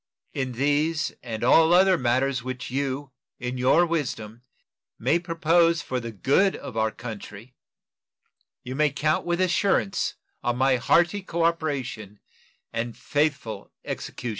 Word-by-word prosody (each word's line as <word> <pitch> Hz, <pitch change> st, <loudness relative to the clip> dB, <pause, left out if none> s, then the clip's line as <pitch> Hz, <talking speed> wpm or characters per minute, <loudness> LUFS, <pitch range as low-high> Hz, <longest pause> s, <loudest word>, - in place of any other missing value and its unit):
In 130 Hz, -2 st, -2 dB
these 145 Hz, +5 st, +1 dB
and 115 Hz, -2 st, -5 dB
all 160 Hz, +7 st, +6 dB
other 190 Hz, +1 st, +6 dB
matters 130 Hz, -1 st, +1 dB
which 130 Hz, 0 st, -6 dB
you 135 Hz, +1 st, -2 dB, 0.3 s
in 125 Hz, 0 st, -4 dB
your 130 Hz, +7 st, +4 dB
wisdom 120 Hz, -9 st, -3 dB, 0.6 s
may 170 Hz, -, +2 dB
propose 165 Hz, -1 st, +2 dB
for 130 Hz, -, -2 dB
the 115 Hz, -1 st, -6 dB
good 140 Hz, -, +2 dB
of 120 Hz, -, -8 dB
our 110 Hz, 0 st, +2 dB
country, 110 Hz, +1 st, -9 dB, 1.1 s
you 125 Hz, -, -6 dB
may 150 Hz, +2 st, +2 dB
count 155 Hz, +4 st, 0 dB
with 175 Hz, 0 st, 0 dB
assurance 195 Hz, +2 st, +1 dB, 0.3 s
on 120 Hz, -1 st, 0 dB
my 130 Hz, 0 st, +3 dB
hearty 175 Hz, +10 st, +2 dB
cooperation 150 Hz, -, -2 dB, 0.5 s
and 115 Hz, 0 st, -3 dB
faithful 145 Hz, -6 st, -2 dB
execution. 120 Hz, -, -5 dB
135 Hz, 130 wpm, -25 LUFS, 120-165 Hz, 1.1 s, all